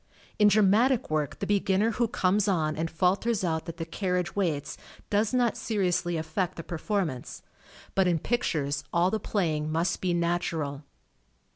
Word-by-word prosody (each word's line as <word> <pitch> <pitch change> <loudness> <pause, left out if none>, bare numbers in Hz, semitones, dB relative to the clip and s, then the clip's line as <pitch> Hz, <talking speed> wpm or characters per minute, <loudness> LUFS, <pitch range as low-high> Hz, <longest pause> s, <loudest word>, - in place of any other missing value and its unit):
In 210 - +7
dramatic 215 +3 +3
work 150 -2 -1
the - - -3
beginner 200 +2 +2
who 235 +1 +1
comes 200 -1 +1
on 155 -5 +1
and 165 +1 -2
falters 190 +6 +1
out 160 -2 -1
that 165 0 -6
the 165 - -4
carriage 180 +1 -2
waits, 155 -8 -1 0.4
does 210 +1 +2
not 245 -2 +2
seriously 180 -5 0
affect 160 +3 -2
the 165 - -5
perform 180 +2 -1
ance, 125 -1 -9 0.5
but 190 -1 +3
in 175 -2 +2
pictures 150 - -1
all 175 +2 +2
the 220 - 0
playing 155 -8 -1
must 165 +3 0
be 180 -2 +1
natural. 170 -4 -1
180 Hz, 160 wpm, -28 LUFS, 160-205 Hz, 0.5 s, In